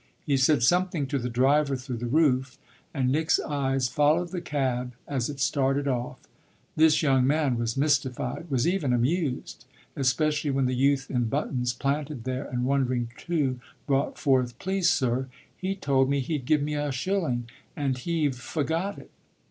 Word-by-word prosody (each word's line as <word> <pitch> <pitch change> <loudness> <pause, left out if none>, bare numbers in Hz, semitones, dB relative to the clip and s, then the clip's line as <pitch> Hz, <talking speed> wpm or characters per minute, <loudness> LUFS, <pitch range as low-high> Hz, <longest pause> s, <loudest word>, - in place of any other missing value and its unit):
He 145 - +2
said 135 -1 +3
something 175 0 +2
to 140 +1 -2
the 125 0 -3
driver 135 +4 +2
through 125 -1 -5
the 120 +1 -4
roof, 130 -2 +2 0.3
and 130 -3 0
Nick's 155 +3 +2
eyes 135 -3 0
followed 155 +5 +2
the 180 -1 -4
cab 125 -5 -2
as 135 -3 -1
it 145 -2 -6
started 135 +2 +1
off. 125 -2 -2 0.6
This 160 0 +4
young 135 -3 +3
man 145 -3 +2
was 115 +1 -2
mystified, 140 +1 0
was 130 -1 +1
even 170 -8 +1
amused; 130 -2 -1 0.3
especially 150 +3 +1
when 135 -1 +1
the 130 - 0
youth 135 +1 +1
in 125 -2 +1
buttons, 125 -1 -1
planted 140 0 -2
there 130 +2 -3
and 125 -2 -2
wondering 130 -3 0
too, 145 -7 -1 0.3
brought 140 -1 0
forth: 125 -3 +1
"Please 190 0 +1
sir, 130 -2 +1 0.3
he 190 +1 -3
told 135 -7 +1
me 140 0 +1
he'd 135 0 -3
give 150 +1 +2
me 150 +1 -2
a 145 -1 -1
shilling 130 -4 -1 0.3
and 135 -3 -1
he've 155 -2 0
forgot 160 +9 -2
it." - - -13
135 Hz, 165 wpm, -27 LUFS, 125-150 Hz, 0.6 s, This